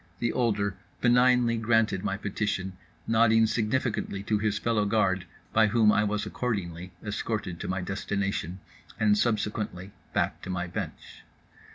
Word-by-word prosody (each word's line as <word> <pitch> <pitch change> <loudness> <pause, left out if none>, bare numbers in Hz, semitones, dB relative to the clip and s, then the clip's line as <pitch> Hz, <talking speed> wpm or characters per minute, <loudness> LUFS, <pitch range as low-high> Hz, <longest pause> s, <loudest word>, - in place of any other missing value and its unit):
The 120 +4 -1
older 100 -5 0 0.2
benignly 125 -1 +4
granted 110 -4 +2
my 95 -1 -1
petition, 95 -2 -2 0.3
nodding 115 0 +4
significantly 110 -3 -1
to 105 0 0
his 105 -1 0
fellow 110 -1 +1
guard, 100 -4 +1 0.3
by 110 0 +5
whom 110 0 +4
I 105 - +3
was 105 0 -1
accordingly 90 -7 -3
escorted 105 -4 -3
to - - -5
my 95 0 -1
destination 95 -1 -3 0.4
and 105 -1 +4
subsequently 105 -4 -1 0.2
back - - 0
to - - -8
my 90 -1 -2
bench. 90 - -7
105 Hz, 140 wpm, -28 LUFS, 95-115 Hz, 0.4 s, by